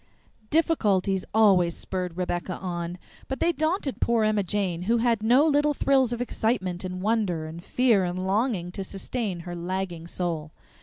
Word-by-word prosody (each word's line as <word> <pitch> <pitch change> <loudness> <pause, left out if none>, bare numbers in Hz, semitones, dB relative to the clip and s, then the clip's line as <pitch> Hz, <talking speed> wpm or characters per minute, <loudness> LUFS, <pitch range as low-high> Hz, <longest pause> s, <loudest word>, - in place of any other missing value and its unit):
Difficulties 205 - +2
always 190 -6 +4
spurred 180 -2 -4
Rebecca 180 0 -2
on, 175 -1 -4 0.3
but 265 - -4
they 340 - +3
daunted 315 -2 -1
poor 235 -2 +2
Emma 215 -1 +2
Jane, 185 -3 -1
who 235 - +4
had 230 -2 +2
no 245 +7 +5
little 295 -1 +3
thrills 265 -3 +3
of 240 - -2
excitement 205 -7 -1
and 185 0 -5
wonder 205 -7 0
and 165 +2 -8
fear 235 -5 +3
and 180 0 -2
longing 195 -3 0
to 195 - -5
sustain 195 -1 -4
her 175 0 -6
lagging 175 -1 -4
soul. 165 -4 -3
195 Hz, 160 wpm, -26 LUFS, 175-235 Hz, 0.3 s, no